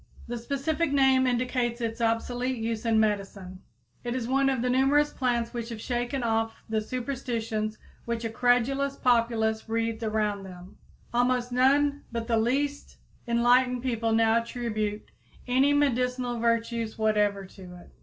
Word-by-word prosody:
The 240 0 -4
specific 280 +6 -1
name 265 -2 +4
indicates 245 -1 0
its 230 0 -3
obsolete 245 +3 0
use 225 0 -3
in 225 -1 +3
medicine. 195 -3 -2 0.4
It 240 0 -3
is 245 -3 -3
one 270 +1 +2
of 260 -3 -1
the 250 - +1
numerous 280 +3 +3
plants 240 -3 -1
which 235 -1 -4
have 230 -2 -6
shaken 245 +2 -2
off 225 -1 0
the 220 -1 0
superstitions 230 -3 -3 0.3
which 235 0 -3
a 225 - -2
credulous 250 +4 +1
populace 230 -3 +1
wreathed 225 0 -1
around 215 -2 -1
them. 185 -1 -12 0.4
Almost 245 0 +1
none 280 +3 +3
but 230 -1 -3
the 230 -1 +1
least 280 +6 -1 0.3
enlightened 245 +1 +3
people 230 -3 -1
now 225 +1 +3
attribute 215 -3 -4 0.3
any 265 +3 +3
medicinal 250 -3 +1
virtues 230 -1 -1
whatever 210 -2 +1
to 185 -1 -12
it. 175 - -15
235 Hz, 145 wpm, -27 LUFS, 225-255 Hz, 0.4 s, name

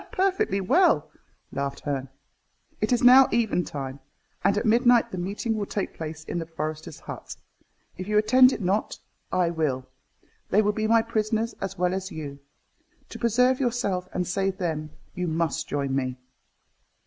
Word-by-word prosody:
"Perfectly 370 - +1
well," 320 - +3 0.4
laughed 140 0 -3
Herne. 135 -2 -3 0.7
"It - - 0
is 245 -1 +2
now 255 +2 +9
eventide, 155 - -1 0.4
and 200 +2 +3
at 215 - 0
midnight 240 +1 +4
the 185 - -4
meeting 200 +6 -2
will 205 -2 -3
take 200 - -3
place 160 -1 -6
in 175 - -4
the 165 - -5
forester's 155 -1 -5
hut. - - -8 0.6
If 185 - -6
you 210 0 +1
attend 255 +5 +6
it - - -4
not, 195 +3 0 0.3
I 180 -2 +2
will. 145 -6 -1 0.6
They 210 +3 +4
will 210 - +2
be 215 +1 -1
my 230 0 +4
prisoners 225 0 -1
as 195 0 -4
well 180 0 +1
as 190 +1 -4
you. 145 -3 -7 0.7
To - - -8
preserve 250 +2 +3
yourself 225 -8 -1
and 180 - -1
save 190 +1 -1
them, 160 -5 -2 0.2
you 180 0 -3
must 160 -1 -1
join 140 -2 -1
me." 130 -1 -2
190 Hz, 160 wpm, -26 LUFS, 160-225 Hz, 0.7 s, now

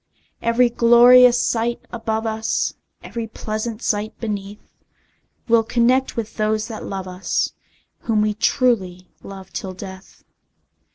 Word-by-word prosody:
Every 230 +2 +3
glorious 245 +1 +6
sight 235 +1 0
above 225 -1 -2
us, 220 0 -1 0.3
Every 230 -1 -5
pleasant 220 +1 -5
sight 210 0 -2
beneath, 205 -2 -6 0.7
We'll 230 -1 +5
connect 245 +3 +1
with 225 -2 -5
those 215 0 0
that 220 - -7
love 190 -1 -5
us, 185 +1 -2 0.5
Whom 215 -2 0
we 210 0 0
truly 200 -6 0
love 190 -1 -11
till 190 -1 -5
death! 190 0 -11
220 Hz, 120 wpm, -21 LUFS, 205-235 Hz, 0.7 s, glorious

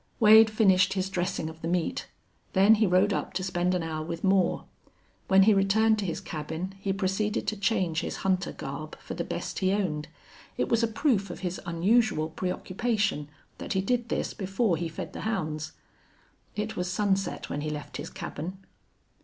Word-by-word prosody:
Wade 220 0 +8
finished 190 -4 +4
his 190 0 -2
dressing 175 -3 -1
of 160 0 -9
the 165 - -3
meat. 175 -1 -1 0.5
Then 195 +3 +6
he 215 - +5
rode 185 +3 +3
up - - -3
to 185 - -2
spend 180 -1 0
an 180 - -1
hour 155 -1 -3
with 165 +1 -5
Moore. 190 -2 +2 0.6
When 190 0 +6
he 215 +2 +6
returned 215 +3 +3
to 200 - -2
his 165 - -2
cabin 160 +4 -5
he 195 0 -1
proceeded 195 +2 -1
to 215 - -1
change 190 -6 0
his - - -4
hunter 190 0 +1
garb - - -7
for - - -8
the - - -3
best - - -4
he 190 -1 +2
owned. 165 -7 -1 0.5
It - - 0
was 230 -1 +3
a 230 - +3
proof 220 -3 +1
of - - -7
his 180 -1 -3
unusual 175 -1 +2
preoccupation 185 -2 -1 0.3
that - - -3
he 190 - +1
did 235 +3 -1
this - - -1
before 195 0 0
he 170 0 -3
fed 160 - -7
the - - -6
hounds. 155 -7 -3 0.8
It 215 +1 -3
was 180 -1 -2
sunset 195 -1 -1
when 145 - -2
he 155 - -2
left 150 -1 -6
his - - -6
cabin. 180 0 -6
190 Hz, 185 wpm, -28 LUFS, 170-210 Hz, 0.8 s, Wade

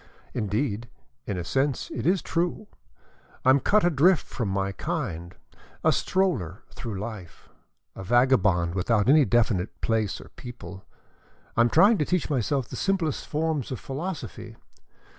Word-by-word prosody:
Indeed, 110 +1 -2 0.4
in 100 - -2
a 90 - -3
sense 135 +8 -1
it - - -2
is 185 0 +2
true. 175 +5 -1 0.8
I 130 - +7
am 135 - +5
cut 210 +8 +3
adrift 175 +1 +4
from 115 -5 -3
my 95 0 -1
kind, 95 - -4 0.5
a - - +5
stroller 125 - 0
through 110 -6 -6
life, 100 -5 -8 0.5
a 95 - -7
vagabond 105 -7 +3
without 105 +3 +1
any 145 +1 +6
definite 110 -6 +1
place 110 -4 0
or - - -12
people. 100 -7 -10 0.7
I - - +4
am 120 - +4
trying 200 - +5
to 150 - +2
teach 180 -2 0
myself 135 -1 0
the - - -8
simplest 185 -6 -1
forms 155 -3 -1
of 130 - -4
philosophy. 145 -6 -6
120 Hz, 145 wpm, -26 LUFS, 100-155 Hz, 0.8 s, I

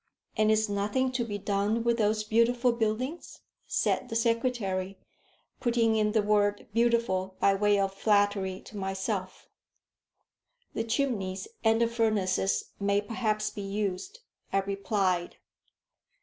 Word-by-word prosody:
"And 215 0 +3
is 215 0 +3
nothing 205 +6 0
to 250 -1 -1
be 210 -3 -4
done 205 +3 0
with 235 0 +1
those 215 0 +2
beautiful 235 +3 +3
buildings?" 235 +7 -3 0.3
said - - 0
the 225 - -4
secretary, 225 -5 0 0.6
putting 235 -2 +2
in 210 -1 +1
the 215 -2 +3
word 205 0 +1
beautiful 230 -5 +1
by 195 - +4
way 205 +1 +3
of 195 -1 0
flattery 200 -2 +1
to 210 - -11
myself. 190 0 -3 1.3
"The 225 - -2
chimneys 215 -7 -1 0.2
and 225 0 +4
the 235 - +3
furnaces 215 -5 0
may 200 0 +2
perhaps 215 0 -1
be 205 - -7
used," 200 - -3 0.3
I 195 - +2
replied. 195 -2 -1
210 Hz, 130 wpm, -29 LUFS, 195-230 Hz, 1.3 s, by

